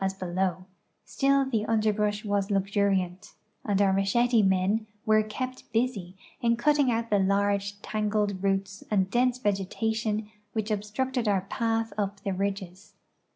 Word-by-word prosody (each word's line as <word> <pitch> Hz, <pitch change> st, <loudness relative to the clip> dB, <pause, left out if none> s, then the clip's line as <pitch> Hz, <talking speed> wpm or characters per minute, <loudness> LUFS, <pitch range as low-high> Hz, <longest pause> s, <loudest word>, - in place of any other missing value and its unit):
as 190 Hz, 0 st, 0 dB
below, 185 Hz, 0 st, -2 dB, 0.4 s
still 275 Hz, 0 st, +2 dB
the 220 Hz, -3 st, +1 dB
underl)rush 215 Hz, -1 st, +1 dB
was 200 Hz, -1 st, 0 dB
luxuriant, 195 Hz, -1 st, 0 dB, 0.3 s
and 200 Hz, -2 st, 0 dB
our 195 Hz, -1 st, +4 dB
machete 225 Hz, +5 st, +3 dB
men 190 Hz, +3 st, +2 dB, 0.2 s
were 215 Hz, -1 st, +5 dB
kept 255 Hz, +5 st, -6 dB
busy 220 Hz, -6 st, -1 dB, 0.3 s
in 235 Hz, 0 st, +2 dB
cutting 290 Hz, +1 st, +3 dB
out 230 Hz, -1 st, -2 dB
the 205 Hz, -, +4 dB
large 200 Hz, +1 st, +1 dB
tangled 210 Hz, -2 st, -1 dB
roots 195 Hz, 0 st, -1 dB
and 190 Hz, -3 st, +1 dB
dense 245 Hz, +1 st, +2 dB
vegetation 215 Hz, 0 st, -1 dB, 0.3 s
which 220 Hz, -1 st, -2 dB
obstructed 225 Hz, +4 st, -1 dB
our 200 Hz, -2 st, +2 dB
path 225 Hz, +2 st, -1 dB
up 200 Hz, -1 st, -2 dB
the 195 Hz, -1 st, -2 dB
ridges. 195 Hz, 0 st, -4 dB
205 Hz, 140 wpm, -27 LUFS, 195-225 Hz, 0.4 s, were